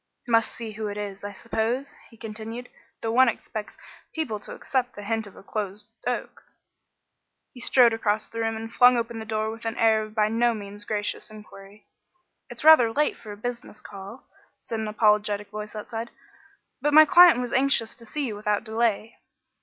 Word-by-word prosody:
"Must 230 -1 +3
see 230 -2 -7
who 215 0 -5
it 205 0 -5
is, 200 -1 -6
I 205 - -5
suppose," 230 +6 -2
he 230 - -18
continued, 225 +2 -7 0.3
"though 225 - -1
one 255 +2 +5
expects 215 -1 -6 0.4
people 260 -10 -2
to - - -8
accept 255 -2 -2
the 205 - -8
hint 220 0 -2
of 200 - -15
a - - -14
closed 205 0 -4 0.2
oak." - - -3 1.1
He 250 - -12
strode 240 -1 +5
across 215 -1 0
the 230 - -7
room 225 0 -1
and 225 +1 -7
flung 245 0 +6
open 230 -1 -3
the 220 - -6
door 220 0 -2
with 225 +1 -10
an 225 0 -3
air 220 -1 +4
of 215 0 -8
by 210 -1 +3
no 230 +1 +2
means 205 0 -9
gracious 210 -1 -3
inquiry. 210 -1 -14 0.6
"It's - - -9
rather 300 -8 +7
late 300 +6 +1
for 215 - -11
a 205 - -8
business 240 -1 -6
call," 200 +5 -11 0.3
said 225 - -5
an 220 - -3
apologetic 210 -1 +1
voice 210 0 -7
outside, 225 +2 -5 0.7
"but 295 0 +2
my 310 0 +10
client 350 -2 +7
was 245 -1 -3
anxious 260 -4 +2
to 235 - -13
see 285 +6 -3
you 220 -5 -4
without 210 0 -1
delay." 225 -1 -1
225 Hz, 190 wpm, -25 LUFS, 210-235 Hz, 1.1 s, my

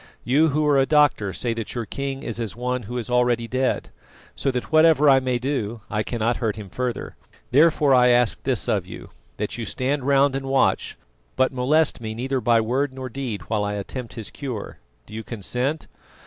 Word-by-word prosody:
You 145 +6 +3
who 150 0 +1
are 145 -2 +4
a 135 - +2
doctor 145 -10 +3
say 115 +4 -2
that 115 0 -5
your 120 -2 -2
king 135 +4 -4
is 115 0 -4
as 110 -5 -4
one 125 +1 -2
who 125 - -4
is 120 - -4
already 120 -1 +1
dead, 130 +2 -1 0.4
so - - -1
that 125 -2 -3
whatever 155 -2 +5
I 135 -1 +7
may 130 -1 -1
do 120 -4 -3
I 105 - 0
cannot 115 +1 -1
hurt 110 -4 -1
him 105 -4 -9
further. 125 -1 -4 0.4
Therefore 150 0 +4
I 125 -1 +6
ask 120 -1 +3
this - - 0
of - - 0
you, - - -10 0.3
that 105 +3 -4
you - - -3
stand 130 +6 -2
round 140 0 +3
and 135 0 -3
watch, 135 0 +1 0.4
but 130 +1 +2
molest 140 +2 +2
me 110 -1 -5
neither 130 +2 -2
by 120 -2 +4
word 130 +4 -1
nor 130 -1 -6
deed 125 -4 -5
while 110 -2 -1
I 105 0 -2
attempt 115 +4 -6
his 110 -4 -7
cure. 125 -7 -6 0.3
Do - - -14
you 110 +1 -5
consent?" 125 +8 -3
125 Hz, 205 wpm, -23 LUFS, 115-135 Hz, 0.4 s, I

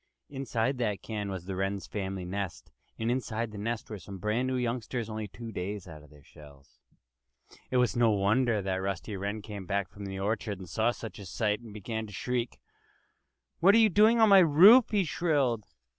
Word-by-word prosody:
Inside 130 -2 -2
that 105 -5 -1
can 105 -2 -4
was 95 -3 -5
the 95 0 -4
Wren 95 +1 -1
family's 95 -2 -5
nest. 95 -1 -5 0.3
And 115 +1 -1
inside 115 -3 -2
the 105 - -8
nest 115 +2 -3
were 105 -2 -7
some 95 +3 -9
brand 105 +6 -1
new 130 - -1
youngsters, 120 -2 -2
only 110 -1 -4
two 115 +3 -9
days 100 0 -5
out 80 -3 -10
of 75 - -17
their 75 -2 -18
shells. 70 -1 -17 0.9
It 130 - +1
was 125 -2 +2
no 120 -1 +4
wonder 105 +2 +2
that 95 -1 -1
when - - -3
Rusty 95 +1 -3
Wren 100 +2 -4
came 100 -3 -8
hack 100 -2 -1
from 105 -1 -9
the 95 -1 -5
orchard 105 0 -2
and 95 -1 -10
saw 110 +7 +1
such 115 -2 -6
a 100 - -9
sight 105 +4 -1
he 115 - -11
began 110 +1 -5
to 105 - -12
shriek. 120 +3 -3 1.0
"What 195 +5 +6
are - - +7
you 220 -1 +6
doing 215 +5 +5
on 220 -1 +6
my 195 -1 +9
roof?" 185 - +7
he 205 -3 +2
shrilled. 145 - 0
110 Hz, 205 wpm, -29 LUFS, 100-125 Hz, 1.0 s, my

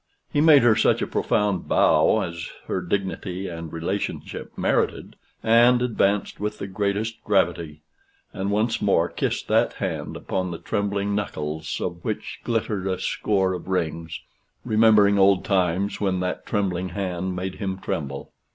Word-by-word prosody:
He 145 - +3
made 150 -4 +7
her 115 -2 +5
such - - +2
a - - +1
profound 100 -4 0
bow - - +4
as 85 0 -5 0.2
her 95 - -2
dignity 95 0 -3
and 85 -2 -7
relationship 85 +5 -4
merited, - - 0 0.3
and 120 +2 +5
advanced 105 -5 0
with 105 +1 -3
the - - -5
greatest 100 +3 -2
gravity, 75 -2 0 0.5
and 95 +1 -2
once 110 +3 0
more - - +3
kissed - - -2
that - - +3
hand, - - -4
upon 95 -1 -2
the 85 - -5
trembling 100 +1 -1
knuckles 80 -6 -3
of - - -4
which - - -4
glittered 110 -4 -1
a 95 -1 0
score 95 0 0
of 90 - -6
rings 85 -3 -2 0.5
remembering 105 -2 +5
old 95 -1 +4
times 95 +1 0
when 95 -2 +1
that 90 0 -3
trembling 95 -3 -1
hand 90 -1 -3
made 95 +1 -4
him 95 -3 -2
tremble. 75 -8 -4
95 Hz, 150 wpm, -24 LUFS, 90-105 Hz, 0.5 s, made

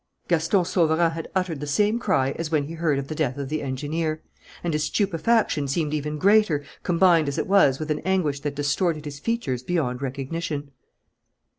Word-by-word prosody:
Gaston 170 +2 +2
Sauverand 165 -1 +2
had 165 -1 -5
uttered 180 -5 -1
the 150 - -5
same 210 +10 +2
cry 160 - +1
as 160 +2 -4
when 155 -3 +1
he 155 +4 -7
heard 160 -4 0
of 140 0 -3
the 155 - -4
death 145 -5 -1
of 140 -2 -4
the 155 0 -2
engineer; 155 +4 -3 0.4
and 170 -2 -1
his 150 0 0
stupefaction 195 -5 +1
seemed 150 +2 -1
even 150 0 -2
greater, 195 -5 +3 0.2
combined 170 -3 +3
as 140 +1 -2
it 155 - 0
was 185 -9 +4
with 155 +1 -4
an 150 - 0
anguish 170 -6 0
that 145 0 -4
distorted 150 +2 0
his 145 -1 -7
features 145 - -2
beyond 125 -4 -1
recognition. 140 +2 -4
155 Hz, 185 wpm, -24 LUFS, 145-175 Hz, 0.4 s, was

